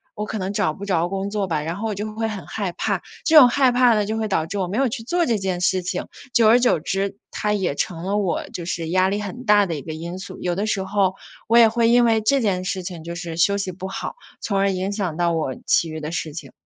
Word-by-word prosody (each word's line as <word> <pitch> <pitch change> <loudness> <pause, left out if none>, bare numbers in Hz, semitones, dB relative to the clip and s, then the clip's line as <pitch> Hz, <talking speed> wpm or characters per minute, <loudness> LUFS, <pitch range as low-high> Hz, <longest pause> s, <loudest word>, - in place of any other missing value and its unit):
我 210 -1 -3
可 220 - -4
能 190 +1 -3
找 155 -5 +1
不 200 - -8
着 175 -3 +1
工 195 +1 -3
作 205 -1 -1
吧。” 160 -4 -1
然 165 +2 -3
后 220 +3 -3
我 - - -1
就 210 +2 -5
会 225 0 -1
很 200 -4 -6
害 200 -4 -3
怕。 170 - -2 0.2
这 320 -1 +6
种 270 -5 +10
害 260 0 +3
怕 245 -1 +5
呢 210 -1 +1
就 220 +2 -2
会 220 -1 -1
导 160 -5 +1
致 195 +5 -5
我 190 -2 -1
没 200 - -2
有 270 - +3
去 225 0 -5
做 345 +8 +1
这 235 -6 +1
件 190 -2 -2
事 185 0 +2
情， 180 0 -3 0.3
久 230 -3 +5
而 230 +3 +6
久 245 -9 +3
之， 195 +4 -2
它 210 - -1
也 190 -8 -1
成 165 +2 -3
了 200 +2 0
我 195 -4 -1
就 175 - -6
是 170 -2 -3
压 185 +2 +3
力 205 +2 -1
很 210 +5 -6
大 210 -2 +5
的 170 -4 -3
一 145 - -5
个 160 - -6
因 170 +3 -6
素。 190 - -9
有 175 -1 -1
的 200 +3 -1
时 195 -2 0
候， 190 -1 +1 0.3
我 230 - +5
也 235 -1 +8
会 230 0 +2
因 240 0 +5
为 225 -1 +3
这 275 +6 +3
件 190 -5 0
事 185 0 -2
情 175 -3 -7
就 170 +1 -6
是 170 -2 -5
休 200 +4 +3
息 195 -2 -3
不 190 +2 -6
好， 195 - -5 0.3
从 200 - -1
而 195 0 +2
影 190 +1 -2
响 185 -6 -3
到 170 -1 +1
我 155 -5 -1
其 165 - +2
余 155 0 -5
的 150 +1 -4
事 160 -2 -3
情。 145 -4 -8
195 Hz, 305 characters per minute, -22 LUFS, 175-215 Hz, 0.3 s, 种